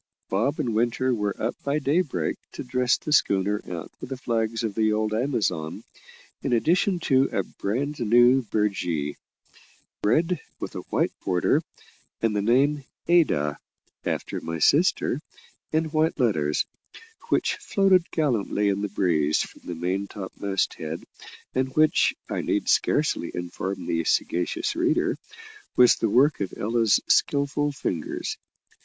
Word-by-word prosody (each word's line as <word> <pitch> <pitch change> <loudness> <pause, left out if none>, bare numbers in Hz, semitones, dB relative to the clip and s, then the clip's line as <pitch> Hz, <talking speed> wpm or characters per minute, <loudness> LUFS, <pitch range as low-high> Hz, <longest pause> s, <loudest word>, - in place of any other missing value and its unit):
Bob 115 +11 0
and 125 -7 -1
Winter 120 +3 +1
were 105 -3 -2
up - - -1
by 140 +1 0
daybreak 140 - 0 0.2
to - - -6
dress 125 0 +1
the 150 - -6
schooner 100 -5 +2
out 85 -3 -6
with - - -7
the 135 - -4
flags 115 -2 -1
of 110 -3 -1
the 110 +1 +2
old 110 0 0
Amazon, 110 - -1 0.6
in - - -1
addition 175 - +2
to 135 -4 +3
a 95 - 0
bran 125 +12 -3
new 120 +3 +5
burgee 95 - -1 0.9
red, 165 - +2 0.2
with - - -5
a - - -4
white - - +1
border, 90 -2 +2 0.6
and 115 -2 0
the 105 - +1
name 135 +7 +2 0.2
Ada, 110 - +3 0.4
after - - -3
my 80 0 -4
sister, 150 - +3 0.5
in 160 +1 +1
white 155 0 +1
letters 75 - +1 0.6
which - - +1
floated 195 - +2
gallantly 115 -8 0
in 100 0 0
the 105 - -2
breeze 80 -6 +1
from - - -12
the 85 - -5
main 95 +4 -2
topmast 100 0 -2
head, 80 0 -5 0.5
and 130 0 -1
which, 155 0 +4
I - - -2
need - - -1
scarcely 150 - +2
inform 90 +2 -4
the 85 0 0
sagacious 90 - 0
reader, 350 +1 +1 0.6
was 125 -1 +6
the 115 - 0
work 135 +5 +3
of 95 - -3
Ella's 115 0 +2
skilful 145 +1 +2
fingers. 90 - -3
115 Hz, 140 wpm, -25 LUFS, 95-145 Hz, 0.9 s, was